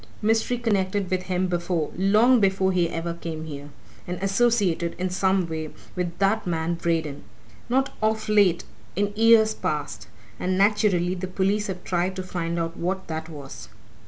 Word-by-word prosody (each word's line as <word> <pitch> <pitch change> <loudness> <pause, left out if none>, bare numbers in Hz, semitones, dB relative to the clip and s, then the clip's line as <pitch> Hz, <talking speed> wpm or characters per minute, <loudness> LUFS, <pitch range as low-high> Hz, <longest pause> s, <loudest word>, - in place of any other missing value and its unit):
Mystery 225 +3 +2
connected 200 -4 0
with 185 -1 +1
him 185 0 +1
before 175 -3 -1
long 215 +7 +4
before 190 -2 +2
he 175 -2 +1
ever 170 +1 -3
came 165 -2 -6
here. 145 -2 -8 0.4
And 180 0 -3
associated, 195 -5 +2
in 185 0 -2
some 190 -1 +1
way, 160 -1 -4 0.3
with 175 -1 -3
that 200 +1 +1
man 165 0 0
Braden. 165 -4 -2 0.5
Not 265 +2 +1
of 215 0 0
late 205 -5 +4 0.3
in 205 +2 0
years 220 0 +5
past. 150 -1 -3 0.3
And, 185 0 0
naturally, 195 -3 +3
the 185 0 -4
police 195 +3 0
have 180 -2 -5
tried 180 +1 -1
to 185 - -4
find 170 -2 -3
out 165 0 -2
what 190 +2 -3
that 160 0 -4
was." 145 -4 -9
185 Hz, 160 wpm, -25 LUFS, 170-205 Hz, 0.5 s, years